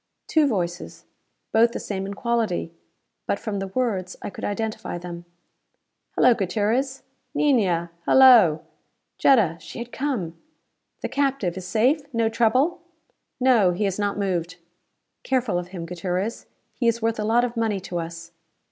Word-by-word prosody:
Two 310 -2 +3
voices. 175 -7 -3 0.5
Both 230 +1 +4
the - - -3
same 195 -1 -4
in 200 - -6
quality. 225 -8 -1 0.5
But - - +1
from 205 -2 -4
the 195 - -3
words 190 -4 -2
I - - -5
could - - -10
identify 215 -3 -3
them. 175 0 -8 0.9
"Hello, 250 - +6
Gutierrez." 225 +7 -1 0.3
"Niña, 190 - +2 0.2
hello." 235 -13 +7 0.6
Jetta! 210 - +4
She 155 - -10
had 235 +1 -6
come! 240 - -3 0.7
"The - - -2
captive 275 -11 0
is 185 -1 -7
safe? 245 - +2
No 230 -1 +2
trouble?" 255 +10 +2 0.6
"No. 235 -8 +4
He 195 +5 -2
has 195 -1 -1
not 205 -1 -1
moved." 180 -3 -2 0.7
"Careful 250 -8 0
of 175 - -6
him, 180 -2 -7
Gutierrez. 180 +5 -3 0.3
He 240 - -1
is 230 0 +1
worth 225 -1 0
a - - 0
lot 230 +3 +3
of 240 0 -5
money 220 -3 0
to 175 -1 -4
us." 165 0 -7
210 Hz, 150 wpm, -24 LUFS, 180-240 Hz, 0.9 s, hello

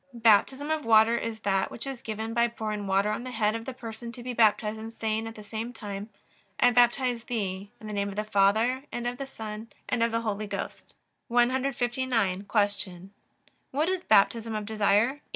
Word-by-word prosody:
Baptism 235 +6 +3
of 315 -1 0
water 225 +1 +5
is 230 -2 -3
that 195 -2 +1
which 235 - -7
is 270 -3 -5
given 220 +1 -4
by 235 +1 +3
pouring 215 -3 -4
water 195 +2 +2
on 235 - -3
the 255 - -6
head 215 -3 +1
of 230 0 -5
the 265 - -5
person 235 -1 -7
to 240 - -9
be 250 0 -4
baptized, 220 -1 +3
and 225 +1 -7
saying 220 0 -2
at 225 - -8
the 215 - -10
same 220 +3 -5
time: 205 -1 -6 0.5
I 245 - +6
baptize 245 0 +3
thee 200 -4 -3
in - - -11
the 215 - -5
name 200 0 -1
of 195 - -7
the 210 - -1
Father, 215 +5 +2
and 240 - -4
of 245 +1 -3
the 275 - -4
Son, 220 -3 -7 0.2
and 235 - 0
of 230 0 +3
the 230 0 0
Holy 215 -1 -2
Ghost. 200 -1 -6 0.3
159. 245 -5 +1
Q. 200 -3 -1 0.6
What 300 +6 0
is 375 -1 -1
Baptism 220 +2 +3
of 210 -1 -3
desire? 220 +5 +2
225 Hz, 200 wpm, -28 LUFS, 210-240 Hz, 0.6 s, I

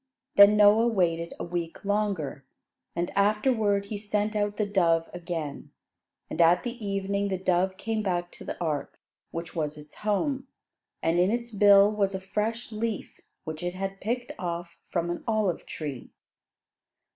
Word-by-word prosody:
Then 200 +1 +8
Noah 210 +3 +6
waited 170 -6 0
a - - -3
week 170 +1 -4
longer, 200 -9 -1 0.5
and 170 +1 -1
afterward 210 0 +2
he 205 0 -5
sent 210 +1 -1
out 205 0 0
the 210 - +1
dove 170 -5 +2
again. 170 -5 -5 0.6
And 165 - -1
at 170 +2 +5
the 240 -2 -5
evening, 200 0 -1
the 190 -1 -1
dove 185 +1 +1
came 220 +2 -2
back 175 -3 -1
to - - -11
the - - -6
ark, 155 -4 -2 0.3
which 165 0 -6
was 150 -2 -2
its 150 0 -13
home; 260 +6 -1 0.6
and 165 +2 +2
in 180 +2 +4
its 235 +1 -2
bill 205 0 +6
was 200 -2 0
a - - -2
fresh 215 +5 -3
leaf 220 -1 -4 0.2
which 155 -1 -6
it 175 +1 -3
had 195 +1 -4
picked 240 +3 -2
off 170 -1 -4
from 170 -1 -1
an 175 - -5
olive 215 -6 0
tree. 145 -5 -6
195 Hz, 160 wpm, -27 LUFS, 170-210 Hz, 0.6 s, Then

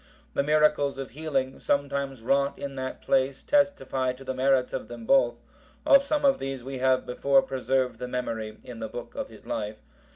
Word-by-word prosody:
The - - +2
miracles 150 -1 +3
of 135 -3 -6
healing, 135 -2 -2
sometimes 140 -3 -1
wrought 140 +3 +1
in 140 -1 -5
that 130 -1 -5
place 135 0 +1
testify 280 - +1
to 130 +1 -12
the 130 - -3
merits 130 0 +2
of 130 - -4
them 120 -1 -9
both; 120 -2 +4 0.5
of 275 - +7
some 295 0 0
of 275 -1 +4
these 135 -2 -4
we 135 0 -5
have 130 0 +2
before 135 +2 +3
preserved 130 -2 -1
the 125 - -4
memory 115 -3 -4
in 120 -2 -9
the 110 -1 -4
book 120 - -8
of - - -5
his - - -15
life. 105 0 -3
135 Hz, 190 wpm, -27 LUFS, 125-140 Hz, 0.5 s, of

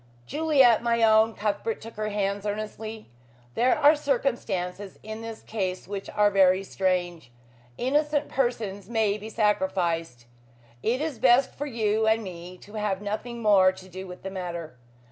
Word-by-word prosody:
"Juliet, 280 - +4
my 235 -1 +1
own," 220 0 +5
Cuthbert 215 - -2
took 225 +1 -10
her 215 0 -3
hands 200 -1 -1
earnestly, 215 - -5 0.4
"there 250 +2 +3
are 300 +1 +6
circumstances 205 -9 -2
in 220 +1 -7
this 225 -1 -8
case 185 -5 -3
which 200 0 -5
are 205 0 +3
very 190 -1 +4
strange. 175 -7 -2 0.5
Innocent 295 +3 +1
persons 220 -6 -2
may 215 -3 +1
be 215 +2 -8
sacrificed. 180 - 0 0.6
It 245 +5 0
is 305 -7 -3
best 255 +1 +4
for 290 - -5
you 220 -3 0
and 220 +1 +3
me 180 -1 -9
to 205 - -15
have 210 -3 -1
nothing 225 +3 -5
more 195 -3 +6
to 185 0 -13
do 190 +1 -8
with 180 0 -10
the 190 - -5
matter. 170 -6 -6
210 Hz, 155 wpm, -26 LUFS, 190-235 Hz, 0.6 s, are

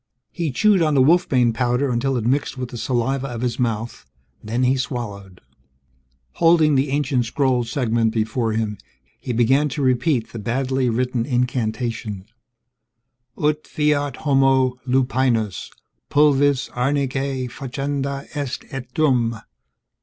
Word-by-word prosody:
He 170 -3 -2
chewed 205 +6 +3
on 155 -2 +2
the 135 - +5
wolfbane 130 -7 +3
powder 125 +3 0
until 125 +2 0
it 115 - -3
mixed 135 +2 0
with 125 -1 -4
the 120 - -7
saliva 130 +3 -1
of 120 -3 -6
his 125 0 -2
mouth, 115 -1 -2 0.4
then 115 +4 -1
he 130 +1 +3
swallowed. 105 -8 -5 1.0
Holding 165 -2 +4
the 135 +1 +2
ancient 135 -3 0
scroll 130 -2 +1
segment 115 -2 0
before 110 +1 -1
him, 110 -2 -2 0.4
he - - -5
began 130 +6 +3
to 140 +2 -3
repeat 130 -1 +1
the 115 - -5
badly 130 +3 0
written 125 0 0
incantation: 115 -5 -2 1.1
_Ut 150 0 0
fiat 145 -2 0
homo 135 -2 +3
lupinus, 125 -6 0 0.4
pulvis 145 -2 +3
arnicae 135 0 -1
facenda 140 +2 -4
est 140 -3 -3
et 125 -2 -6
dum.... 120 -7 +2
130 Hz, 130 wpm, -21 LUFS, 120-140 Hz, 1.1 s, the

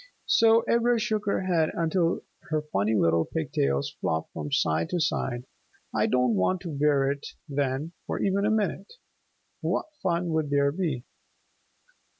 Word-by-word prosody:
So 225 0 +5
Ivra 235 0 +3
shook 215 -2 -1
her 200 - +1
head 170 -4 +2
until 165 +1 +1 0.3
her 155 -1 0
funny 105 +3 +2
little 85 -4 +3
pigtails 70 -2 -1
flopped 80 0 -2
from 75 -2 -5
side 80 +1 +1
to 180 - -1
side. 125 -5 -1 0.5
"I - - +2
don't 125 -2 +2
want 110 - +1
to 170 - -5
wear 140 -1 +2
it 140 0 -5 0.2
then 140 +2 -1 0.2
for - - -2
even 200 0 +1
a 210 - +2
minute. 205 -2 -1 0.7
What - - 0 0.2
fun 175 -2 0
would 160 -2 0
there 140 0 +3
be?" 155 -7 -2
155 Hz, 155 wpm, -27 LUFS, 125-185 Hz, 0.7 s, So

